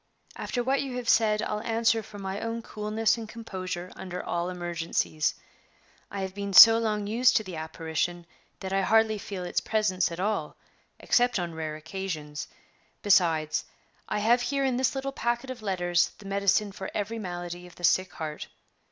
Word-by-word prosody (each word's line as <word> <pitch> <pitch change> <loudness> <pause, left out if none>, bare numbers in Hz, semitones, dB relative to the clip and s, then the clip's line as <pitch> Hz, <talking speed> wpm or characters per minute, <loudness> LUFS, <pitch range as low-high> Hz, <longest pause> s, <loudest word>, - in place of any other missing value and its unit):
After 245 - -2
what 270 +2 +1
you 265 -3 -4
have 245 -2 -5
said, 215 -2 +3
I'll 210 0 -2
answer 230 0 +2
for 210 -1 -12
my 195 0 -4
own 230 0 -3
coolness 215 +1 0
and 220 -1 -7
composure 185 -6 -6
under 180 -1 -6
all 175 +1 -1
emergencies. 170 -3 -1 0.7
I 200 - -5
have 190 -1 -4
been 200 0 -4
so 225 +3 +11
long 210 -2 -1
used 245 +5 +4
to 220 - -1
the 185 -5 -7
apparition 160 +2 -3 0.4
that 190 -1 -4
I 195 - +2
hardly 220 +1 +3
feel 195 -2 -6
its 175 - -1
presence 200 -5 +1
at 170 - -6
all 210 +3 -2 0.4
except 245 -1 +2
on 175 -2 -3
rare 160 -1 -4
occasions. 155 -3 -5 0.6
Besides, 165 -6 +3 0.4
I - - 0
have 230 +4 +3
here 275 +2 0
in 255 -2 +1
this 260 +1 +1
little 270 0 -2
packet 240 0 -2
of 250 -3 -8
letters 175 -4 +1
the 205 - -14
medicine 200 +1 +1
for 190 0 -6
every 215 +2 -2
malady 175 -2 -6
of 175 - -16
the 175 - -14
sick 185 +1 +3
heart. 155 -1 -5
200 Hz, 180 wpm, -28 LUFS, 175-225 Hz, 0.7 s, so